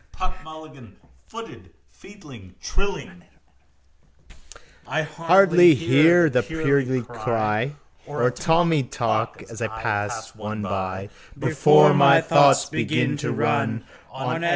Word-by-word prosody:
Puck 185 0 -6
Mulligan 155 -8 -14 0.3
footed - - -12 0.2
featly, 140 - -16
trilling: 190 - -6 1.6
I 160 +2 -2
hardly 170 +2 +4
hear 160 +8 +3
the 125 -2 +1
purlieu 140 -5 -1
cry 115 +1 -3 0.3
Or 145 -5 -2
a 125 - +2
Tommy 165 +1 0
talk 115 -2 -3
as 115 0 -10
I 115 - -1
pass 110 0 -5
one 105 0 -7
by 95 0 -5 0.3
Before 75 0 +4
my - - +5
thoughts - - +4
begin - - -2
to - - -4
run - - -2 0.3
On 130 +5 -5
F. 170 - 0
130 Hz, 115 wpm, -22 LUFS, 110-160 Hz, 1.6 s, my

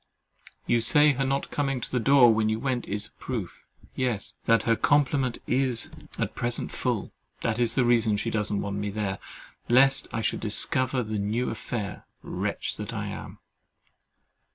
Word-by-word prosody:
You 120 -1 +2
say 150 +5 +5
her 135 +1 -1
not 135 +1 -1
coming 135 -3 -1
to - - -6
the 125 - +1
door 125 -1 +6
when 110 0 +1
you 110 0 -1
went 130 -1 -2
is 105 +1 0
a - - -28
proof—yes, 115 0 -5
that 115 -1 +3
her 115 0 +3
complement 135 -2 +2
is 125 -3 0 0.3
at - - -2
present 120 0 -2
full! - - -2 0.3
That 115 0 -1
is 120 -1 +1
the 130 - +3
reason 115 -3 +3
she 115 +2 -2
doesn't 105 -2 -1
want 100 0 -3
me 105 0 -2
there, 100 -2 -3 0.5
lest 135 +3 +5
I 115 - -2
should - - -1
discover 130 +4 +3
the 110 -1 -3
new 110 +5 -1
affair—wretch 110 -2 -5
that - - -6
I - - -3
am! - - -8
115 Hz, 165 wpm, -26 LUFS, 110-130 Hz, 0.5 s, door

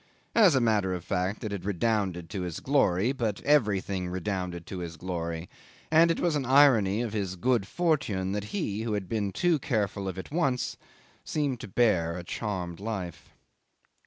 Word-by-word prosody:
As 200 -10 +6
a - - +4
matter 105 -6 +2
of 90 -1 -7
fact, 95 +3 -1
it 110 - -3
had 100 -3 -4
redounded 100 -3 0
to 100 - -3
his 90 -2 -4
glory. 120 -6 +2
But 115 -7 -2
everything 100 -9 +2
redounded 90 -2 -3
to 95 - -6
his 85 -2 -6
glory; 85 -1 -4 0.4
and 165 +1 +6
it 165 - +1
was 170 -2 +1
the 145 - +1
irony 120 -6 +5
of 115 -3 -4
his 100 -4 -2
good 115 0 +1
fortune 140 - 0
that 105 0 -2
he, 110 - -3
who 115 -1 -2
had 100 -3 -2
been 105 -2 -1
too 170 - +2
careful 105 -7 -1
of 95 -1 -4
it 95 - -7
once, 135 -6 0 0.5
seemed 140 -5 -1
to - - -7
bear 90 -6 +2
a 90 - -6
charmed 90 -3 -4
life. 95 -6 -5
105 Hz, 180 wpm, -28 LUFS, 90-125 Hz, 0.5 s, As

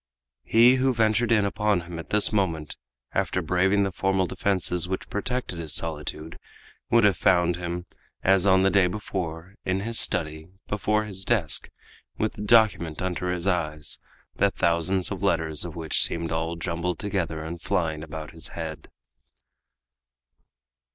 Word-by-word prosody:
He 120 +3 +5
who 130 0 +1
ventured 115 +1 +2
in 105 -3 +4
upon 105 -2 +1
him 85 0 -8
at 80 - -9
this 105 +1 +3
moment, 80 -7 -1 0.4
after - - 0
braving 95 +3 +2
the 95 - -1
formal 95 +1 +1
defenses 90 -1 0
which 95 - -4
protected 115 -4 -3
his 80 -2 -1
solitude, 80 0 -4 0.5
would 115 -1 +4
have 105 -2 +4
found 90 -2 +3
him, 90 0 -4 0.4
as 95 0 +4
on 95 -1 +5
the 95 - +3
day 95 -3 +4
before, 90 -3 -5
in 95 +1 -1
his 115 +2 +1
study, 80 -3 +1 0.2
before 105 +1 0
his 95 -2 -2
desk, 95 -11 +1 0.5
with 110 - -1
the - - -9
document 105 -7 +3
under 90 -1 -2
his 90 -1 -3
eyes, 75 -6 -1 0.4
the - - +4
thousands 85 +3 +1
of 95 -3 -4
letters 80 -5 0
of 85 - -7
which 80 -2 +1
seemed 85 0 -1
all 80 +1 -2
jumbled 85 0 -3
together 90 -6 -3
and 85 +2 -7
flying 80 -6 -1
about 80 0 -7
his 80 0 -4
head. 80 -2 -6
90 Hz, 155 wpm, -25 LUFS, 80-100 Hz, 0.5 s, He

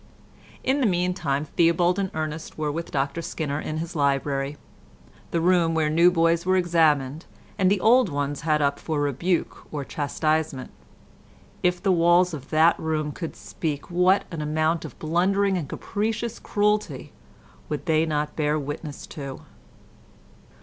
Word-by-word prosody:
In 275 +2 +1
the 250 - +4
meantime 175 -6 0
Theobald 170 +4 +2
and 195 -1 -1
Ernest 155 0 -4
were 155 -1 -1
with 165 +3 -4
Dr 140 +3 -1
Skinner 150 -3 -3
in 155 0 -4
his 165 +2 -5
library—the 140 0 0 0.8
room 170 -1 +3
where 155 -1 +1
new 170 +3 +6
boys 165 -1 +2
were 185 +1 +2
examined 160 -4 +2 0.3
and 190 -1 +4
old 235 +1 +5
ones 145 -1 -2
had 150 -1 +1
up 140 0 +1
for 155 -2 -2
rebuke 145 +5 -1
or 145 -2 -4
chastisement. 155 -1 -1 0.9
If 180 0 +1
the 195 - +3
walls 175 +1 +4
of 140 -4 -7
that 160 +2 +4
room 155 -2 -1
could 165 +2 -6
speak, 150 -1 -5
what 180 +3 +3
an 165 -3 -4
amount 155 +2 0
of - - -10
blundering 190 +5 +1
and 160 -6 -3
capricious 225 +2 -3
cruelty 210 0 -1 0.6
would - - -3
they 160 -2 +3
not 150 -1 -2
bear 150 -1 +1
witness 145 0 -6
to! 140 -3 -7
160 Hz, 145 wpm, -25 LUFS, 150-180 Hz, 0.9 s, new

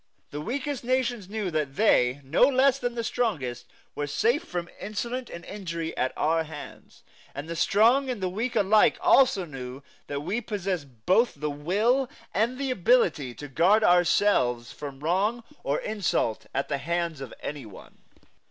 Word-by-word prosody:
The 150 - -5
weakest 270 - -3
nations 245 -5 -1
knew 210 -3 -3
that 150 -4 -2
they, 140 - +3
no 135 +4 -1
less 270 0 +3
than 245 -1 -2
the 230 - -2
strongest, 155 - -2 0.3
were 145 - -3
safe 235 - +1
from 175 -1 -4
insult 235 +4 -4
and 170 0 -9
injury 170 -5 -5
at 130 - 0
our 160 +1 +2
hands; 150 -2 -11 0.3
and 145 +3 -6
the 170 - -4
strong 235 +10 +3
and 245 -4 -2
the 190 - -1
weak 220 +7 -3
alike 210 +2 +4
also 255 -9 +4
knew 135 -2 -8 0.2
that 145 0 -3
we 200 +9 -1
possessed 180 - -4
both 230 +6 +3
the 150 +1 -3
will 210 - +1 0.2
and 230 +5 +1
the 275 -1 -2
ability 255 - +2
to 145 - -8
guard 180 +10 +3
ourselves 175 - +3
from 140 -2 -8
wrong 200 +9 0 0.2
or 140 - 0
insult 200 - -1
at 135 +1 -2
the 140 -2 -2
hands 170 -1 -2
of 135 - -7
any 145 -5 -5
one. 100 - -14
180 Hz, 165 wpm, -26 LUFS, 145-235 Hz, 0.3 s, alike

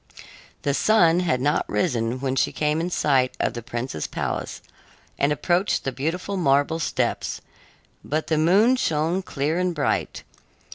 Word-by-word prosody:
The 140 - +1
sun 175 -1 +4
had 165 -8 +1
not 145 +3 0
risen 115 +3 0
when 135 -1 -1
she 135 - +1
came 150 +1 0
in 175 - -2
sight 130 -7 +1
of - - 0
the 120 - -5
prince's 120 - -4
palace - - -4 0.6
and 140 - +2
approached 175 +6 +1
the 135 - -2
beautiful 170 +9 -3
marble 145 0 +2
steps, - - -1 0.6
but 155 +2 -2
the 155 -1 0
moon 205 +11 +4
shone 165 -2 0
clear 155 -1 -2
and 180 -1 0
bright. 145 - -1
150 Hz, 150 wpm, -24 LUFS, 135-175 Hz, 0.6 s, sun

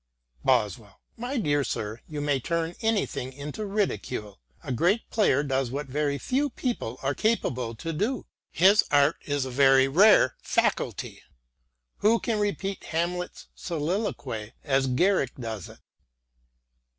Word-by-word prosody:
Boswell: 110 -5 0
" - - -44
My 265 +3 -2
dear 145 - +1
sir, 110 -2 -4
you 150 -2 -5
may 145 -2 +1
turn 165 +5 -2
anything 215 - -1
into 145 +10 -6
ridicule... 130 - -2 0.2
a - - -5
great 180 - +1
player 150 - +3
does 135 -3 0
what 140 +4 -3
very 140 +1 -1
few 275 - 0
people 235 - -3
are 135 +1 +1
capable 130 - 0
to 165 +9 -5
do: 215 - -1 0.2
his 195 +5 +5
art 145 +2 +4
is 145 -2 -1
a 130 - -5
very 135 0 +5
rare 175 - +5
faculty. - - -1 0.8
Who 225 +2 +3
can 220 -3 -1
repeat 200 -1 -2
Hamlet's 175 +2 -3
soliloquy 150 - -3
as 135 -2 +2
Garrick 140 +2 +2
does 110 -6 -6
it - - -13
145 Hz, 140 wpm, -27 LUFS, 130-200 Hz, 0.8 s, his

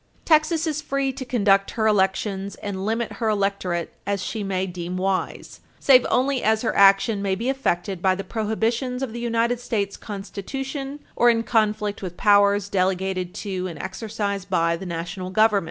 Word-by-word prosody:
Texas 315 +1 +3
is 305 -1 -2
free 275 -2 -1
to 265 0 -6
conduct 200 -6 +2
her 220 - +1
elections 195 -1 +1
and 195 -1 -5
limit 225 +1 -1
her 225 -2 0
electorate 195 -4 -1
as 200 -2 -1
she 220 - -4
may 190 -1 -1
deem 180 0 -5
wise, 190 0 -2 0.2
save 255 -3 +5
only 265 +1 +1
as 220 +1 +2
her 230 - 0
action 200 +2 +5
may 195 -1 0
be 230 +6 -2
affected 195 -9 -1
by 185 0 +3
the 195 - -5
prohibitions 230 +5 -1
of 245 -4 -4
the 235 - -5
United 235 0 0
States 205 -5 -2
Constitution 270 +8 -6
or 240 - +5
in 230 -1 +2
conflict 210 -3 0
with 180 -3 -6
powers 205 -1 +4
delegated 185 -1 -1
to 185 -2 -2
and 170 -4 -7
exercised 200 0 -4
by 170 -2 +2
the 185 +2 -7
National 175 +2 -5
Government. 215 +1 +4
205 Hz, 170 wpm, -23 LUFS, 190-235 Hz, 0.2 s, save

